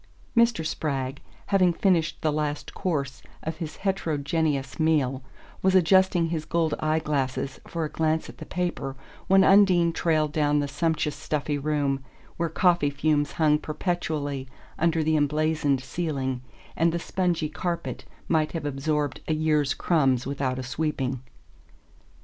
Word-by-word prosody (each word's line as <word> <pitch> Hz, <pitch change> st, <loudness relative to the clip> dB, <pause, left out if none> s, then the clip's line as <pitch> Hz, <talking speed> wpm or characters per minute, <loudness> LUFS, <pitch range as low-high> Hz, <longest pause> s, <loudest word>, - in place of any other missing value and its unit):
Mr. 235 Hz, -8 st, +3 dB
Spragg, 140 Hz, -3 st, -2 dB, 0.3 s
having 190 Hz, -3 st, +3 dB
finished 170 Hz, -3 st, +1 dB
the 155 Hz, -, +2 dB
last 150 Hz, -1 st, -3 dB
course 145 Hz, -8 st, -2 dB, 0.2 s
of 160 Hz, 0 st, -4 dB
his 160 Hz, -3 st, -5 dB
heterogeneous 155 Hz, -6 st, -1 dB
meal, 145 Hz, -5 st, +2 dB, 0.4 s
was 190 Hz, 0 st, +3 dB
adjusting 185 Hz, -1 st, +4 dB
his 160 Hz, -2 st, -2 dB
gold 160 Hz, -1 st, 0 dB
eye 155 Hz, 0 st, +1 dB
glasses 140 Hz, -3 st, -2 dB
for 165 Hz, -2 st, -2 dB
a -, -, -4 dB
glance 160 Hz, 0 st, 0 dB
at -, -, -12 dB
the -, -, -7 dB
paper 175 Hz, -7 st, -3 dB, 0.3 s
when 195 Hz, 0 st, +6 dB
Undine 185 Hz, -4 st, +5 dB
trailed 155 Hz, -3 st, +1 dB
down 150 Hz, -1 st, +2 dB
the 145 Hz, -1 st, +1 dB
sumptuous 155 Hz, 0 st, -1 dB
stuffy 145 Hz, -1 st, -2 dB
room, 140 Hz, -2 st, 0 dB, 0.3 s
where 170 Hz, 0 st, 0 dB
coffee 170 Hz, -2 st, +3 dB
fumes 145 Hz, 0 st, 0 dB
hung 150 Hz, -2 st, +3 dB
perpetually 150 Hz, -5 st, -3 dB, 0.3 s
under 165 Hz, -1 st, +2 dB
the 155 Hz, +1 st, +2 dB
emblazoned 150 Hz, -2 st, +1 dB
ceiling 135 Hz, -4 st, -2 dB, 0.3 s
and 165 Hz, +1 st, +3 dB
the 170 Hz, -, -1 dB
spongy 170 Hz, -2 st, -1 dB
carpet 170 Hz, +2 st, -4 dB, 0.2 s
might 155 Hz, -2 st, +1 dB
have 165 Hz, -3 st, -4 dB
absorbed 145 Hz, 0 st, -1 dB
a 155 Hz, -, +1 dB
year's 155 Hz, -3 st, +1 dB
crumbs 135 Hz, -7 st, +2 dB
without 135 Hz, -2 st, -2 dB
a 130 Hz, -, -4 dB
sweeping. 135 Hz, -2 st, -2 dB
155 Hz, 145 wpm, -26 LUFS, 145-170 Hz, 0.4 s, when